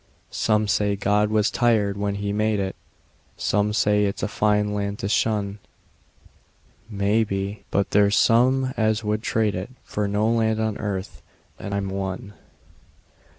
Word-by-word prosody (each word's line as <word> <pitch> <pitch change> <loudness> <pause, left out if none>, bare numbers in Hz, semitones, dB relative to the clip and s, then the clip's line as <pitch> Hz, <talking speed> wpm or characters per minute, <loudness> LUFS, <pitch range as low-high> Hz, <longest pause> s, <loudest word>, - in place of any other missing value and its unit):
Some 110 -1 +1
say 100 0 +1
God 105 +1 +1
was 110 0 +2
tired 110 -5 +2
when 100 0 -2
He 100 0 -3
made 105 0 +1
it; 95 -1 -2 0.6
Some 105 0 +1
say 105 -1 +2
it's 100 -1 -3
a - - +1
fine 105 0 +1
land 100 0 -2
to 100 - -3
shun; 105 -1 0 1.3
Maybe; 100 -1 -1
but 100 - 0
there's 100 0 +4
some 130 +3 +3
as 110 0 +1
would 105 0 -1
trade 110 -2 0
it 95 +4 -5
For 105 -1 -2
no 105 +2 +1
land 110 -1 +1
on 110 -1 -1
earth 100 -2 -4 0.4
and 100 - -4
I'm 100 -1 -2
one. 95 +2 -4
105 Hz, 150 wpm, -23 LUFS, 100-110 Hz, 1.3 s, there's